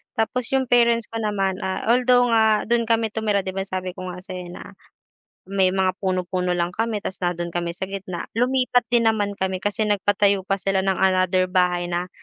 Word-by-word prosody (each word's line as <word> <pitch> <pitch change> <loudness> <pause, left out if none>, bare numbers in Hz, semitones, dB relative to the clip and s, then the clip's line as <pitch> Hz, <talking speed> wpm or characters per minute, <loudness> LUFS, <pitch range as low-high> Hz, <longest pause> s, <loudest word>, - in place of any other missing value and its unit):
Tapos 235 +2 -1
yung 265 - +2
parents 235 -1 +3
ko 230 - -4
naman, 195 -3 -1
ah, 190 0 -3
although 250 0 +4
nga 220 -1 +3
dun 235 -1 +2
kami 225 -1 +2
tumira, 215 -3 0
'di - - -4
ba 195 +1 -3
sabi 185 -1 -4
ko 185 - -6
nga 180 0 -7
sayo 185 -2 -7
na 175 - -10 0.7
may 190 -1 +2
mga 190 -1 +2
puno-puno 185 -1 -1
lang 175 0 0
kami, 225 -1 -1
tapos 190 - -5
nandun 175 -1 -2
kami 175 -1 -2
sa 190 - -3
gitna 190 -3 -6
lumipat 250 +1 +2
din 235 -1 +3
naman 205 -2 -1
kami 190 -1 -2
kasi 205 +1 0
nagpatayo 200 -1 +2
pa 195 - +2
sila 195 0 0
ng 190 0 +1
another 185 -1 +3
bahay 180 -1 +2
na 175 +1 -2
195 Hz, 195 wpm, -22 LUFS, 185-225 Hz, 0.7 s, although